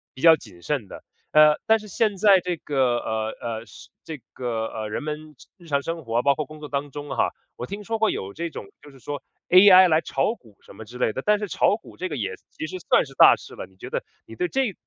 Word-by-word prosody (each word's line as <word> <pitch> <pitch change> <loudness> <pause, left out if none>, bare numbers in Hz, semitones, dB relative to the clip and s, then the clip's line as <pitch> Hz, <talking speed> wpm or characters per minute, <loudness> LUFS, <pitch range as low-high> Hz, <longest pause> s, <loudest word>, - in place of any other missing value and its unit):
比 130 - -11
较 165 -1 +8
谨 95 - -15
慎 135 -9 -2
的。 - - -11 0.3
呃， 150 0 +6
但 225 0 +4
是 210 -1 -12
现 210 +2 0
在 195 -1 +5
这 180 -1 -3
个， 130 -6 0
呃， 110 0 -3
呃， 115 -1 -5
是 - - -15 0.2
这 155 -2 -6 0.2
个， 115 -3 -3
呃， 110 -1 -5
人 125 - -4
们 150 0 -6 0.2
日 175 - -18
日 - - -14
常 140 -2 0
生 165 -2 -5
活， 115 +1 0
包 140 +1 +3
括 155 +1 -4
工 155 +2 -13
作 150 - -8
当 140 0 -3
中 145 +1 -8
哈， 135 - 0 0.2
我 120 - -5
听 205 +5 -7
说 225 +1 -3
过 220 - +3
有 95 +1 -4
这 170 +1 -4
种 105 - -8 0.2
就 145 - -14
是 135 -2 -17
说 145 +5 -6 0.3
AI 185 0 +8
来 155 0 +4
炒 140 +8 -1
股 110 - -22
什 100 - -16
么 110 - -9
之 120 +3 -11
类 120 -3 +1
的， 130 - -5
但 210 0 +4
是 205 -2 -5
炒 - - +2
股 225 - -14
这 185 - -3
个 150 - -5
也 95 -6 -3 0.2
其 155 - -6
实 185 - -6
算 - - +4
是 135 - -14
大 - - +8
事 - - -13
了， - - -7
你 95 - -25
觉 95 - -9
得 - - -2 0.2
你 115 - -12
对 180 - -1
这 265 +5 0
这 - - -18
150 Hz, 295 characters per minute, -24 LUFS, 120-180 Hz, 0.3 s, 较